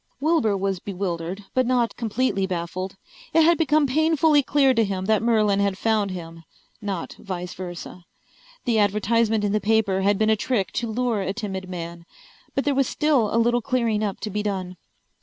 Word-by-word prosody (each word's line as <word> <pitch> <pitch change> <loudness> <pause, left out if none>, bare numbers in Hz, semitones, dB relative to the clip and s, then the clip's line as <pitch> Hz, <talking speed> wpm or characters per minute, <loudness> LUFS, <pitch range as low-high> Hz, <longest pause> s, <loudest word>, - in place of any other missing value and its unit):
Wilbur 285 -9 +2
was 195 -1 -1
bewildered, 185 0 -4
but 255 -1 +2
not 245 -2 +1
completely 225 -3 0
baffled. 185 +1 -4 0.4
It 325 - +6
had 340 +2 +5
become 310 -2 +3
painfully 310 +1 +3
clear 275 -1 +3
to 230 -2 +3
him 190 -2 -2
that 215 0 +2
Merlin 215 -3 +2
had 200 -1 +1
found 215 -2 +1
him, 165 -2 -8 0.4
not 195 -5 -4
vice 180 -3 -5
versa. 175 -1 -8 0.6
The 230 -2 +2
advertisement 215 +2 +2
in 205 - +1
the 210 0 +1
paper 205 -2 +2
had 200 +1 +2
been 220 +1 +2
a - - +4
trick 215 -3 -1
to 235 -2 -2
lure 235 -2 0
a 190 0 -2
timid 190 -4 -5
man. 170 -1 -7 0.5
But 275 - +1
there 290 - +2
was 275 -1 +2
still 285 -8 +2
a - - +1
little 240 +1 +3
clearing 230 -4 0
up 200 -2 -2
to 215 - -4
be 210 +2 -1
done. 190 -3 -3
210 Hz, 185 wpm, -24 LUFS, 190-240 Hz, 0.6 s, It